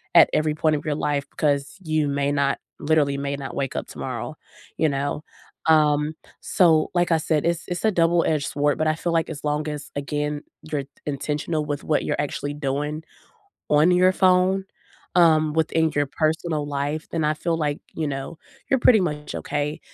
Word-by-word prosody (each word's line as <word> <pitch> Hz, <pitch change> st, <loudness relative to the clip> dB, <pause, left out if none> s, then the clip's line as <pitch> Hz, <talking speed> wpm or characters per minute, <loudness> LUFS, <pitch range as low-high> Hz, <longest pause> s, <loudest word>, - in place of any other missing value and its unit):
at -, -, +8 dB
every 155 Hz, 0 st, +1 dB
point 155 Hz, 0 st, +2 dB
of 145 Hz, -, -4 dB
your 150 Hz, -1 st, 0 dB
life, 145 Hz, -1 st, 0 dB
'cause 140 Hz, +4 st, 0 dB
you 155 Hz, -2 st, +1 dB
may 140 Hz, 0 st, 0 dB
not 140 Hz, -1 st, +1 dB, 0.2 s
literally 145 Hz, -2 st, +2 dB
may 140 Hz, 0 st, -2 dB
not 135 Hz, -3 st, -6 dB
wake 135 Hz, -2 st, -2 dB
up -, -, -3 dB
tomorrow, -, -, -5 dB, 0.4 s
you 160 Hz, -, +3 dB
know, 140 Hz, +2 st, -2 dB, 0.4 s
um, 150 Hz, -1 st, +3 dB, 0.3 s
so 160 Hz, -4 st, +3 dB
like 175 Hz, -1 st, +1 dB
I -, -, +4 dB
said, 155 Hz, -1 st, 0 dB
it's 170 Hz, -1 st, 0 dB
it's 180 Hz, +4 st, -2 dB
a 220 Hz, -, +4 dB
double 170 Hz, -2 st, +3 dB
edged 150 Hz, -3 st, 0 dB
sword, 145 Hz, 0 st, +1 dB
but 155 Hz, -, +1 dB
I 155 Hz, -, +2 dB
feel 170 Hz, +1 st, -2 dB
like 165 Hz, -1 st, +1 dB
as 140 Hz, -, -7 dB
long 150 Hz, +1 st, -1 dB
as, 150 Hz, -1 st, -6 dB
again, 150 Hz, +1 st, -2 dB, 0.3 s
you're 145 Hz, -3 st, -1 dB
t 135 Hz, -, -20 dB, 0.2 s
intentional 150 Hz, +2 st, -2 dB
with 145 Hz, -1 st, -3 dB
what 155 Hz, -, +1 dB
you're -, -, -1 dB
actually 145 Hz, 0 st, -2 dB
doing 150 Hz, +2 st, -2 dB, 0.7 s
on 150 Hz, +4 st, +5 dB
your 180 Hz, +1 st, +5 dB
phone, 185 Hz, +1 st, +3 dB, 0.5 s
um, 155 Hz, -3 st, +5 dB
within 160 Hz, 0 st, +1 dB
your 145 Hz, -1 st, +1 dB
personal 155 Hz, 0 st, -1 dB
life, 145 Hz, +2 st, -3 dB
then 165 Hz, -2 st, -1 dB
I 150 Hz, -, +2 dB
feel 165 Hz, +2 st, -1 dB
like, 150 Hz, -2 st, -1 dB, 0.2 s
you 160 Hz, -, -1 dB
know, 135 Hz, +3 st, -5 dB, 0.3 s
you're 270 Hz, -, +3 dB
pretty 225 Hz, -4 st, +6 dB
much 150 Hz, -4 st, -3 dB
okay. 150 Hz, +1 st, -2 dB
150 Hz, 190 wpm, -23 LUFS, 145-160 Hz, 0.7 s, at